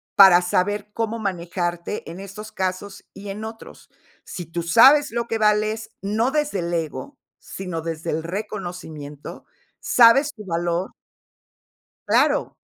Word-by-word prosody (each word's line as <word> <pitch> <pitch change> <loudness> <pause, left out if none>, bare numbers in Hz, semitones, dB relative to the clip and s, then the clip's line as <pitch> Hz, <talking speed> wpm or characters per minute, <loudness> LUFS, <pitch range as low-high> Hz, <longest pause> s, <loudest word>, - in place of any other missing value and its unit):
para 190 -3 +8
saber 205 +4 -1
cómo 230 0 -2
manejarte 175 -2 -3
en 175 +3 -8
estos 210 +2 -9
casos 190 0 -4
y 200 +1 -9
en 205 +2 -6
otros. 225 0 -10 0.3
Si 175 - -7
tú 165 +1 -4
sabes 275 - +6
lo 235 0 -2
que 225 - -1
vales, 215 +1 +1
no 220 +6 0
desde 295 -10 0
el 170 0 -3
ego, 155 -6 -4 0.2
sino 180 -4 -6
desde 165 0 -4
el 160 +1 -2
reconocimiento, 175 -7 -7 0.3
sabes 270 +5 +5
tu 210 -3 -11
valor 170 +1 -2 1.2
Claro, - - +2
195 Hz, 130 wpm, -22 LUFS, 170-215 Hz, 1.2 s, para